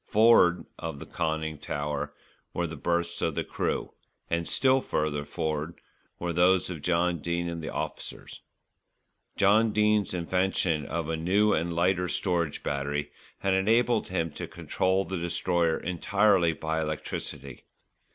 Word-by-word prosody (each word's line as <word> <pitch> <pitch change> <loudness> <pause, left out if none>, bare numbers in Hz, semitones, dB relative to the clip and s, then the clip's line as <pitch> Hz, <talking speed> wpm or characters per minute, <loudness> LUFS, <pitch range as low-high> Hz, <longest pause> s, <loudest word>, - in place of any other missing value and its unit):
For'ard 105 -5 +5
of 80 -3 -5
the - - -8
conning 80 -2 -2
tower 75 0 -3 0.4
were 85 - 0
the 80 0 -5
berths 85 0 -1
of - - 0
the - - 0
crew, - - -2 0.4
and 85 0 0
still 130 0 +3
further 75 -7 -1
for'ard 80 +1 -3 0.4
were 85 0 -3
those 90 +2 +3
of 80 -4 -6
John 85 +1 +1
Dene 85 +3 -2
and 85 -1 -4
the - - -4
officers. - - -6 1.0
John 105 +3 +4
Dene's 105 -2 +2
invention 90 -3 0
of 80 0 -3
a 80 - -1
new 100 +6 +2
and 85 +2 0
lighter 90 +1 +2
storage 85 -4 -1
battery 70 +1 -2 0.3
had 95 -1 +1
enabled 115 +4 +2
him 85 -3 -1
to - - -6
control 95 +1 0
the 95 -2 -3
Destroyer 85 -1 +1
entirely 90 0 +2
by 80 0 -2
electricity. 75 -2 -5
85 Hz, 140 wpm, -28 LUFS, 80-95 Hz, 1.0 s, For'ard